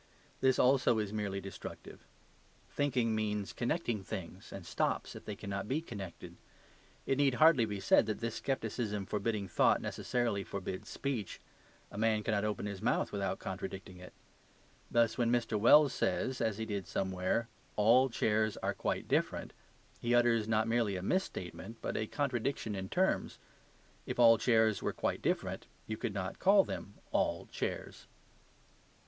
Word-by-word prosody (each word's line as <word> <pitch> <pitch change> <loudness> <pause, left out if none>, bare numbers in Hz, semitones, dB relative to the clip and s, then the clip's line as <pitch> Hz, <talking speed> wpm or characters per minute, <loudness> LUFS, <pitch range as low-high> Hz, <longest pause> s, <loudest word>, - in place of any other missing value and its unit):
This 130 -1 +3
also 125 -2 +4
is 105 -1 -2
merely 100 -2 -2
destructive. 95 0 -9 0.6
Thinking 125 -5 +1
means 105 -2 -2
connecting 120 - -1
things, 95 -1 -7
and 95 -3 -8
stops - - -1
if - - -10
they 105 - -4
cannot 100 0 -4
be 135 +7 0
connected. 100 - -8 0.7
It 135 - 0
need 140 -3 +3
hardly 155 -5 +6
be 105 -2 -4
said - - +4
that 110 - -2
this 115 -1 -3
scepticism 110 -6 -2
forbidding 105 0 -2
thought 85 - +3
necessarily 120 -5 -1
forbids 95 -1 -5
speech; 125 -9 -3 0.5
a 100 - -6
man 110 -1 +2
cannot 105 -2 0
open 105 -1 -2
his 100 -2 -5
mouth - - +1
without - - -2
contradicting 95 -1 -6
it. 90 - -11 0.8
Thus 115 0 +2
when 120 -1 +3
Mr. 120 -2 +1
Wells 140 +5 +7
says 130 -1 -1
(as 110 -3 0
he 110 - -3
did 100 -4 -4
somewhere), 95 +4 -1 0.3
"All 120 +5 +5
chairs 110 -2 +1
are - - -1
quite - - -2
different," - - 0 0.5
he 120 +1 +1
utters 120 -3 +3
not 110 0 +2
merely 115 -3 +1
a 90 - -4
misstatement, 110 - -3
but - - -4
a 110 - -1
contradiction 130 -4 -1
in 95 -1 -4
terms. 190 +1 +1 0.7
If - - -3
all 115 -2 +7
chairs 110 -3 +3
were - - -1
quite - - -2
different, - - -1 0.2
you 110 - -3
could 110 -2 -4
not 95 -1 -4
call 195 +1 +6
them 100 - -6 0.2
"all - - 0
chairs." - - -4
110 Hz, 155 wpm, -33 LUFS, 100-120 Hz, 0.8 s, Wells